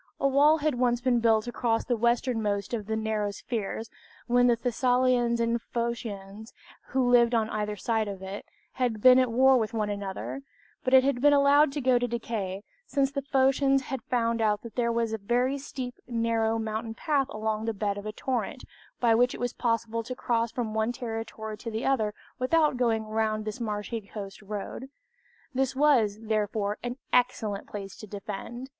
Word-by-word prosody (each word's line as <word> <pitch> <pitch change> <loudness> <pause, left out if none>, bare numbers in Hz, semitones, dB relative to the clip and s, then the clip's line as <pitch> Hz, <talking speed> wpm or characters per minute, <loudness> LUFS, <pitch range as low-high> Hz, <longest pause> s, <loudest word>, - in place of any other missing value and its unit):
A 275 - +3
wall 290 +3 +5
had 300 -5 -1
once 240 -1 +2
been 245 -1 +2
built 225 -1 +3
across 235 -1 -1
the 245 - +1
westernmost 225 -3 0
of 215 -4 -3
these 220 0 -1
narrow 215 -1 -1 0.2
places, 220 0 -3 0.3
when 245 0 +4
the 240 - +4
Thessalians 245 0 +2
and 230 0 +1
Phocians, 220 -3 -5 0.3
who 260 -1 +1
lived 240 -1 +5
on 220 -1 +1
either 210 -1 -2
side 220 +1 -1
of 195 -1 -6
it, 195 +2 -6 0.3
had 245 -4 -1
been 255 0 +8
at 255 -2 +2
war 260 +2 +5
with 225 +1 -2
one 210 -2 0
another; 200 +6 -5 0.4
but 260 0 +4
it 260 - +7
had 270 -2 0
been 290 +1 +6
allowed 285 +1 +5
to 290 - -2
go 255 -1 +3
to 245 - 0
decay, 215 -5 -4 0.2
since 275 -1 +1
the 280 0 -2
Phocians 270 0 +2
had 265 -1 -4
found 230 -1 0
out 210 -1 +1
that 235 - -9
there 235 -1 +1
was 230 -1 0
a 220 - -2
very 245 +6 0
steep 260 -2 -6
narrow 230 -1 +1
mountain 225 0 -3
path 280 0 +1
along 215 -2 -2
the 225 - 0
bed 205 -1 -2
of 205 +1 -6
a - - -2
torrent, 250 +2 -3 0.4
by 235 -2 +4
which 245 +2 +3
it - - -9
was 245 0 -2
possible 230 -1 -1
to 250 +3 -6
cross 235 -2 0
from 230 -4 -3
one 220 +1 +1
territory 225 -3 -5
to 230 - -5
the 220 +2 -3
other 220 -6 +1 0.2
without 300 +3 +3
going 230 -3 +1
round 215 0 -1
this 215 +3 -5
marshy 215 +1 -3
coast 200 -1 -8
road. 210 +5 -6 0.6
This 265 0 0
was, 260 -8 +3
therefore, 210 -1 -1
an 245 +1 -4 0.2
excellent 220 -5 +1
place 200 -2 -7
to 215 - -10
defend. 210 +5 -6
230 Hz, 190 wpm, -28 LUFS, 215-255 Hz, 0.6 s, been